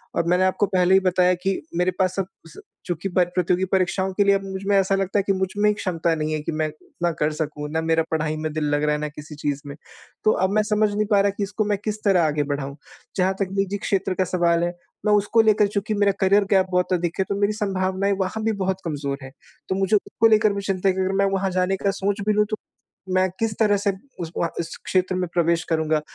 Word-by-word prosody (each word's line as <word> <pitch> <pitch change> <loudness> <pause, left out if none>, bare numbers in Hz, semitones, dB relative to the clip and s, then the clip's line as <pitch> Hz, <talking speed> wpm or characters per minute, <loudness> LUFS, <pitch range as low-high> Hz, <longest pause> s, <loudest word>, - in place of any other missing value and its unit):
और 170 - +1
मैंने 180 +2 +3
आपको 185 +2 +2
पहले 185 -1 +2
ही 190 - +7
बताया 185 -1 +3
कि 195 - +2 0.3
मेरे 180 +1 +2
पास 185 -1 +1
सब 195 - -1
कुछ 165 -4 -19 0.3
चुकी 175 +2 -3
बात 180 -1 +2
प्रतियोगी 180 +1 +1
परीक्षाओं 190 0 +1
के 205 - +3
लिए 200 0 +4
अब 195 - -2
मुझ 190 -1 -6
में 205 - +3
ऐसा 195 0 +2
लगता 195 +1 0
है - - +1
कि 195 - +3
मुझमें 190 +2 +1
ही - - +3
क्षमता 170 -5 -1
नहीं 155 0 -2
है 155 - -1
कि 150 - -3
मैं 155 0 -1
इतना 170 +3 -4
कर 150 +1 +2
सकूँ। 150 -1 -4
ना 160 +1 0
मेरा 160 0 +2
पढ़ाई 155 -1 0
में 155 0 -3
दिल 155 0 -2
लग 145 0 +1
रहा 150 0 +2
है, - - -3
ना 150 - -1
किसी 150 +1 -10
चीज़ 145 -1 -2
में। 140 0 -7 0.5
तो 215 - +5
अब 190 -2 +1
मैं 215 0 +3
समझ 210 0 +2
नहीं 210 +1 0
पा 200 -1 +5
रहा 200 - +3
कि 205 - -1
इसको 205 +2 -2
मैं 205 -1 0
किस 215 0 -4
तरह 190 -4 +4
आगे 150 -1 +1
बढ़ाऊँ। 140 -1 -4 0.4
जहाँ 190 0 +2
तक 195 - 0
निजी 195 +1 0
क्षेत्र 195 -1 -1
का 185 - +1
सवाल 170 -2 +1
है, 175 0 -1 0.3
मैं 210 - +4
उसको 210 +2 +4
लेकर 215 -1 +4
चुकी 205 +2 -2
मेरा 205 -1 +3
करियर 200 +1 +4
गैप 190 -2 +5
बहुत 180 0 +1
अधिक 175 -1 -1
है 190 - +2
तो 200 - 0
मेरी 205 +1 +2
संभावनाएँ 195 -1 0
वहाँ 190 +3 -2
भी 225 - +2
बहुत 190 0 -1
कमज़ोर 145 -3 -3
है। 135 - -9 0.4
तो 190 - 0
मुझे 195 +2 +2
उसको 220 +2 +2
लेकर 215 -1 +4
भी 200 - -3
चिंता 195 -1 0
है 185 - +1
कि 190 - -1
अगर 190 +1 0
मैं - - +4
वहाँ 195 0 0
जाने 185 +1 +1
का 200 - +4
सोच 200 +1 -2
भी 215 - +4
लूँ 210 0 +3
तो 215 - -2 0.6
मैं 185 0 +3
किस 225 -1 0
तरह 210 -2 +4
से 200 0 +1 0.3
उस 165 -1 -5
वहाँ 170 - 0
उस 165 -1 -4
क्षेत्र 185 0 +1
में 180 0 -1
प्रवेश 170 -1 +2
करूँगा? 160 -1 +1
185 Hz, 260 wpm, -23 LUFS, 170-200 Hz, 0.6 s, ही